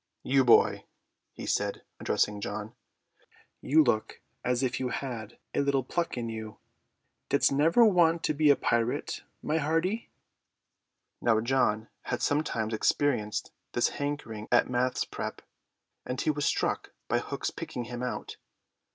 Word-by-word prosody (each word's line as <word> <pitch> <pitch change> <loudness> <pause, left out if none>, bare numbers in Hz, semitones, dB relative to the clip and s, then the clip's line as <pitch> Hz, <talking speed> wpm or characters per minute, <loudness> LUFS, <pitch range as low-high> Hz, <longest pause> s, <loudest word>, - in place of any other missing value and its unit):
"You, 135 0 +3
boy," 120 - +5 0.5
he - - -8
said, - - -1 0.2
addressing 105 -1 0
John, 105 +2 -5 0.9
"you 155 +3 +5
look 110 -5 0 0.2
as 125 +1 +1
if 125 -1 0
you 130 - -1
had 120 -3 -5 0.2
a - - 0
little 140 -2 +1
pluck 170 +3 -2
in 120 -1 -2
you. 110 -1 -6 0.7
Didst 140 - +4
never 160 - +5
want 170 -5 +4
to - - +1
be 150 0 +3
a 145 - +7
pirate, 120 -1 0 0.2
my 155 +2 +1
hearty?" 165 +9 0 1.1
Now 115 -2 +3
John 115 -2 +1 0.2
had - - -2
sometimes 120 -7 0
experienced 110 -2 0 0.2
this - - +2
hankering 145 -7 -4
at 120 - +5
maths. 125 +1 0
prep.; - - -6 0.6
and 125 +1 -4
he 155 - +2
was 145 -1 -2
struck - - -1
by - - +2
Hook's - - -3
picking 125 - -5
him 120 +1 -6
out. 125 - -4
130 Hz, 145 wpm, -29 LUFS, 115-145 Hz, 1.1 s, a